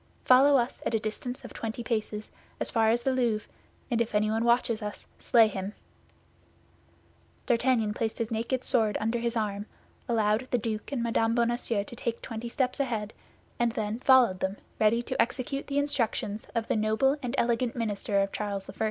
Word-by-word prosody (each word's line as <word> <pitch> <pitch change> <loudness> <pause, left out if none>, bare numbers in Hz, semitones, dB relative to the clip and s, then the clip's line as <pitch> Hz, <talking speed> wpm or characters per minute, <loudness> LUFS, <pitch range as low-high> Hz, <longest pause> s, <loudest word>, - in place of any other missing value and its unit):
Follow 270 +2 +7
us 240 0 -1
at 230 - 0
a - - +2
distance 230 +3 -5
of - - -9
twenty 225 +1 -4
paces, 215 -2 -3 0.3
as - - -1
far 225 -2 +3
as 235 +1 +1
the 265 - +2
Louvre, 235 -5 0 0.4
and 235 -1 +2
if 220 -2 -2
anyone 215 +2 +2
watches 235 -1 +2
us, 210 -1 -6
slay 230 -2 +5
him!" 195 0 -5 1.7
D'Artagnan 235 -3 +2
placed 220 0 -2
his 230 0 -3
naked 235 +3 -1
sword 220 -5 +3
under 225 +2 0
his 235 0 -1
arm, 205 -1 -2 0.4
allowed 225 +2 +1
the 245 - +2
duke 220 +1 -4
and 255 -4 -1
Mme. 230 -1 +1
Bonacieux 235 -3 0
to 240 - -10
take 235 -1 -3
twenty 230 0 -6
steps 255 +2 -1
ahead, 225 -6 -2 0.5
and 235 -1 +2
then 215 0 -2
followed 255 -8 +5
them, 190 +2 -2 0.2
ready 225 +2 +3
to - - 0
execute 265 +4 -2
the 280 - -2
instructions 230 -7 -1
of 230 -1 -1
the - - +1
noble 220 +6 +2
and 250 +1 -3
elegant 235 0 +1
minister 205 -3 0
of 195 0 -1
Charles 200 -2 -3
I. - - -8
230 Hz, 180 wpm, -28 LUFS, 215-240 Hz, 1.7 s, Follow